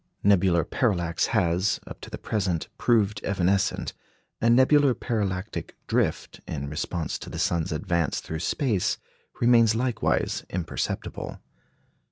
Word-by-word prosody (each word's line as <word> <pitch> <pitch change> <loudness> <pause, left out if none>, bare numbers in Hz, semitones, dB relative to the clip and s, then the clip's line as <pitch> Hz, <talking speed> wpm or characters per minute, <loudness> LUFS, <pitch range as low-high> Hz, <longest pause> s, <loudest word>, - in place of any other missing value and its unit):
Nebular 95 -4 +4
parallax 85 -9 0
has, 95 -2 +1
up - - -10
to - - -8
the - - -6
present, 95 -6 -1
proved 105 -4 +2
evanescent, 95 0 +1 0.5
and 115 +1 +5
nebular 135 0 +5
parallactic 100 -4 -3
drift, - - -1
in 70 -2 -4
response 85 +1 -3
to - - -8
the - - -6
sun's 85 -2 0
advance 85 -4 0
through 80 - -5
space, 110 - 0 0.4
remains 115 -2 +5
likewise 125 0 0
imperceptible. 90 -2 -4
100 Hz, 120 wpm, -26 LUFS, 85-115 Hz, 0.5 s, and